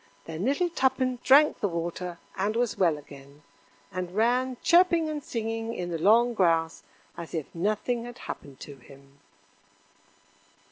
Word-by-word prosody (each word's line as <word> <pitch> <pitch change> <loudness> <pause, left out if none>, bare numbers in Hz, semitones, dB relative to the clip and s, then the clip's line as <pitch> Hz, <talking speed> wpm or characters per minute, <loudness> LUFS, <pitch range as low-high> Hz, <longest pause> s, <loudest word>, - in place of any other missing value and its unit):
Then 165 +4 -5
little 310 +7 +1
Tuppen 260 -3 0
drank 285 +3 +5
the 205 - 0
water, 170 +1 -4 0.2
and 205 +3 -1
was 240 -2 0
well 170 -5 +2
again, 140 0 -14 0.5
and 185 -1 -5
ran 250 +3 +1
chirping 340 -1 +4
and 300 -2 -4
singing 225 -1 -4
in 175 -1 -4
the 165 - -3
long 230 +7 +4
grass 165 -5 +1 0.3
as 170 0 -7
if 155 -3 -5
nothing 215 +6 -1
had 240 0 -9
happened 140 -2 -9
to 140 -2 -9
him. 140 +2 -18
205 Hz, 145 wpm, -27 LUFS, 165-245 Hz, 0.5 s, drank